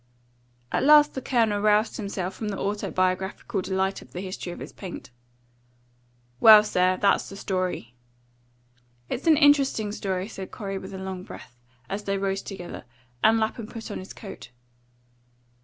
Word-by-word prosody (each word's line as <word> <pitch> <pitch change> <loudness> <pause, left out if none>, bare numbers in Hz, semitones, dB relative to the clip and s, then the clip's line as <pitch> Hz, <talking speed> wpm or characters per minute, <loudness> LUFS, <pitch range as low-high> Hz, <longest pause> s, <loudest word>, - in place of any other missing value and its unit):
At - - +1
last 295 +1 +6
the 265 - -4
Colonel 225 -5 +1
roused 215 +1 +3
himself 195 -3 -4
from 215 +2 -4
the 200 - -3
autobiographical 190 +1 -1
delight 190 +1 -1
of - - -17
the 180 - -4
history 185 -2 -5
of - - -8
his - - -9
paint. 185 -9 -9 1.3
"Well, 215 - +9
sir, 185 -2 +2
that's 200 -1 +2
the 195 - -9
story." 185 - -3 1.2
"It's 275 - -4
an 315 -2 +6
interesting 280 -8 +4
story," 190 -2 -3
said 195 -4 -8
Corey, 195 -2 -5
with 190 - -9
a - - -5
long 190 -1 -5
breath, 125 -8 -11 0.3
as 205 +1 -5
they 195 0 0
rose 195 0 -1
together, 180 -9 -8 0.4
and 220 +1 +6
Lapham 220 0 -2
put 230 -1 -8
on - - -4
his 185 - -9
coat. 195 - -10
195 Hz, 155 wpm, -26 LUFS, 190-220 Hz, 1.3 s, Well